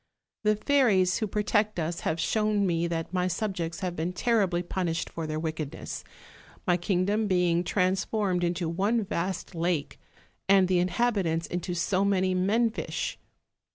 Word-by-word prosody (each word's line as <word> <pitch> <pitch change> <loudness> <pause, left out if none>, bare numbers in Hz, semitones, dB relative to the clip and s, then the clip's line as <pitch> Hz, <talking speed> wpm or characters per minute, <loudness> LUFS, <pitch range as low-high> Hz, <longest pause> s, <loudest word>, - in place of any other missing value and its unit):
The 215 0 +3
fairies 210 -8 +3
who 215 - -1
protect 210 +1 0
us 165 +1 -2
have 160 - -2
shown 210 +3 +1
me 170 -2 +1
that 165 0 -3
my 180 -1 +1
subjects 180 -2 -3
have 180 -2 -2
been 170 +3 -2
terribly 190 -5 +1
punished 170 -2 -2
for 165 -1 -4
their 155 0 -2
wickedness: 155 -2 -5 0.6
my 175 - +3
kingdom 195 +4 +1
being 180 -2 +2
transformed 190 0 0
into 175 0 0
one 200 +7 +1
vast 185 0 -3
lake, 170 -3 -1 0.5
and 195 -1 +6
the 180 -1 +2
inhabitants 180 -4 +1
into 175 0 -3
so 185 +3 +1
many 190 -2 +2
men 215 +6 +2
fish. - - -4
185 Hz, 150 wpm, -28 LUFS, 170-205 Hz, 0.6 s, and